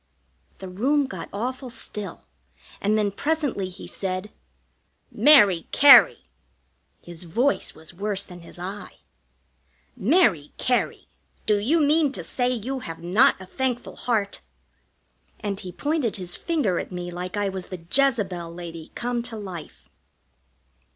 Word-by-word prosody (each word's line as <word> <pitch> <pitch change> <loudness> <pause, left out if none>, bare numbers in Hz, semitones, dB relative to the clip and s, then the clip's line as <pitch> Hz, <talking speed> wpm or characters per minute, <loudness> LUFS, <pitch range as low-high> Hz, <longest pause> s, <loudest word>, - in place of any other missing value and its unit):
The 190 - -8
room 270 +11 +1
got 260 - -7
awful 255 +5 -4
still, 210 -5 -6 0.6
and 210 +2 +2
then 210 -2 +1
presently 285 -6 -1
he 185 +2 -10
said: 190 +1 -3 0.8
"Mary 210 - +6
Cary" 285 0 +8 0.8
his 170 -1 -10
voice 245 +12 0
was 160 +1 -11
worse 200 +2 -1
than 180 -2 -12
his 170 - -14
eye 190 +4 -7 1.0
"Mary 205 - +2
Cary, 250 -1 0 0.4
do 210 - +3
you 285 +11 +2
mean 300 -1 +3
to - - -3
say 250 -1 0
you 255 +2 -3
have 165 -9 -8
not 185 +7 +4
a 190 - -9
thankful 250 +4 -3
heart?" 215 -5 -1 1.0
And 200 -3 -3
he 185 -3 -7
pointed 275 - -1
his 180 -2 -4
finger 290 - 0
at - - -6
me 175 -1 -5
like 180 +3 -5
I 205 -1 0
was 190 -1 -6
the 180 -3 -9
Jezebel 205 -11 +1
lady 170 -2 -9
come 240 0 -2
to 235 -1 -5
life. 185 -6 -9
205 Hz, 135 wpm, -24 LUFS, 180-255 Hz, 1.0 s, Cary